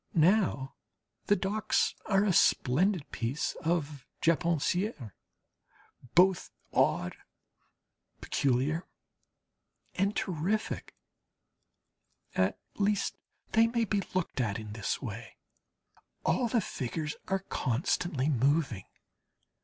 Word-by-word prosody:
Now 165 Hz, -6 st, +3 dB, 0.5 s
the 205 Hz, -, +5 dB
docks 200 Hz, +2 st, +1 dB
are 195 Hz, -1 st, +3 dB
a 200 Hz, -3 st, +2 dB
splendid 170 Hz, +5 st, +3 dB
piece 125 Hz, +6 st, -2 dB
of 155 Hz, -4 st, -1 dB
Japonaiserie, 165 Hz, -, +1 dB, 1.0 s
both 180 Hz, 0 st, +5 dB, 0.2 s
odd, 90 Hz, -, +2 dB, 1.0 s
peculiar, 140 Hz, +6 st, 0 dB, 1.1 s
and 200 Hz, +2 st, 0 dB
terrific. 185 Hz, +5 st, -2 dB, 1.4 s
At 95 Hz, +1 st, +1 dB, 0.2 s
least 205 Hz, 0 st, +1 dB, 0.4 s
they 225 Hz, +1 st, +5 dB
may 230 Hz, 0 st, +1 dB
be 205 Hz, -1 st, 0 dB
looked 175 Hz, -7 st, 0 dB
at 105 Hz, -4 st, -1 dB
in 105 Hz, -2 st, -7 dB
this 110 Hz, +5 st, -2 dB
way. 115 Hz, -1 st, -7 dB, 0.9 s
All 245 Hz, -, +2 dB
the 230 Hz, -1 st, +2 dB
figures 155 Hz, 0 st, -4 dB
are 195 Hz, -, +1 dB
constantly 140 Hz, +3 st, 0 dB
moving. 135 Hz, -, +1 dB
165 Hz, 90 wpm, -30 LUFS, 130-195 Hz, 1.4 s, the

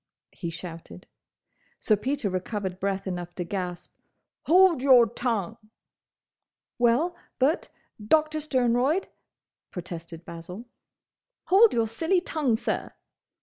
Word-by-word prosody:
he 170 Hz, -, -6 dB
shouted. 165 Hz, -, -9 dB, 0.7 s
Sir 215 Hz, -, +3 dB
Peter 265 Hz, +2 st, -2 dB
recovered 185 Hz, 0 st, -3 dB
breath 195 Hz, 0 st, -2 dB
enough 175 Hz, -2 st, -5 dB
to 180 Hz, -, -3 dB
gasp, 180 Hz, -1 st, -5 dB, 0.5 s
"Hold 360 Hz, -4 st, +5 dB
your 260 Hz, -3 st, +7 dB
tongue!" 225 Hz, -3 st, -2 dB, 1.2 s
"Well, 245 Hz, +9 st, +2 dB, 0.2 s
but, 280 Hz, +6 st, +1 dB, 0.3 s
Doctor 310 Hz, +6 st, +2 dB
Sternroyd—" 260 Hz, +3 st, +1 dB, 0.6 s
protested 170 Hz, -1 st, -8 dB
Basil. 175 Hz, +7 st, -9 dB, 0.8 s
"Hold 415 Hz, +4 st, +7 dB
your 230 Hz, -1 st, +1 dB
silly 325 Hz, -, +1 dB
tongue, 300 Hz, -9 st, 0 dB
sir!" -, -, -3 dB
225 Hz, 105 wpm, -26 LUFS, 180-290 Hz, 1.2 s, your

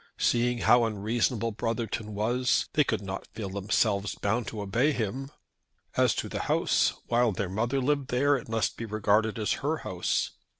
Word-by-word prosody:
Seeing 120 Hz, 0 st, +1 dB
how 120 Hz, +1 st, +6 dB
unreasonable 115 Hz, +2 st, 0 dB
Brotherton 110 Hz, -1 st, -3 dB
was, 120 Hz, +4 st, +1 dB
they 150 Hz, -, +4 dB
could 110 Hz, -6 st, -2 dB
not 95 Hz, 0 st, -5 dB
feel 105 Hz, -4 st, -4 dB
themselves 100 Hz, +1 st, 0 dB
bound 110 Hz, +3 st, -1 dB
to 110 Hz, -, -5 dB
obey 120 Hz, +10 st, +2 dB
him. 130 Hz, +4 st, -3 dB, 0.7 s
As -, -, +3 dB
to -, -, -2 dB
the -, -, -4 dB
house, -, -, +2 dB
while 120 Hz, -1 st, +2 dB
their 95 Hz, -1 st, -3 dB
mother 115 Hz, +8 st, 0 dB
lived 140 Hz, 0 st, 0 dB
there 140 Hz, +2 st, +3 dB
it 125 Hz, -, -5 dB
must 115 Hz, -1 st, 0 dB
be 115 Hz, -, -4 dB
regarded 110 Hz, +1 st, +1 dB
as 105 Hz, -3 st, -1 dB
her -, -, 0 dB
house. -, -, -1 dB
115 Hz, 170 wpm, -28 LUFS, 105-125 Hz, 0.7 s, how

